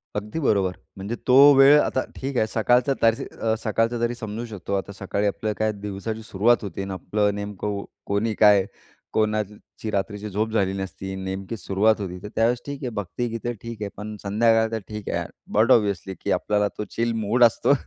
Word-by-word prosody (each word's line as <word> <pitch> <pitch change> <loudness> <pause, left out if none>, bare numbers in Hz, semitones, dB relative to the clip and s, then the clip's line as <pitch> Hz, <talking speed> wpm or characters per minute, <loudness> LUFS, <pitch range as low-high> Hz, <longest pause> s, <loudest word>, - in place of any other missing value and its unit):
अगदी 105 +9 -3
बरोबर. 100 - +1 0.2
म्हणजे 100 +5 -4
तो 125 - +5 0.2
वेळ, 140 +2 +8
आता 130 - 0
ठीक 135 -1 -4
आहे 110 - +2
सकाळचं 125 +5 +2
तर 115 0 +5
स - - -6 0.4
सकाळचं 115 +2 0
तरी 120 +1 0
समजू 110 +1 -5
शकतो 100 -3 -6
आता 100 +1 -3
सकाळी 100 +1 -1
आपलं 105 +1 -2
काय 110 0 +2
दिवसाची 105 +2 -5
सुरुवात 115 +4 +3
होते 100 -1 -5
आणि 95 - -5
आपलं 105 +2 0
नेमकं 100 0 -4 0.2
कोणी 105 +2 0
काय, 105 -3 +6 0.5
कोणाची 110 0 -2
रात्रीची 105 +1 -2
झोप 110 +3 -1
झाली 95 -3 +1
नसती, 95 0 -5
नेमकी 95 +4 -4
सुरुवात 100 +3 +2
होती 90 -2 -5
तर - - -5
त्यावेळेस 115 +2 +2
ठीक 140 -1 -6
आहे 125 - -1
भक्तिगीतं 115 +4 -3
ठीक 115 -2 -8
आहे, 100 - -2
पण 105 +1 -6
संध्याकाळ 110 +2 +3
तर 110 - -1
ठीक 105 -1 -6
आहे - - 0
यार. - - -4 0.3
बट 115 +4 +5
ऑब्वियसली 100 -5 +2
की - - -1
आपल्याला 105 +3 +1
तो 105 - -2
चिल 115 0 +1
मूड 115 +4 +3
असतो. 120 +4 +4
105 Hz, 190 wpm, -24 LUFS, 100-115 Hz, 0.5 s, वेळ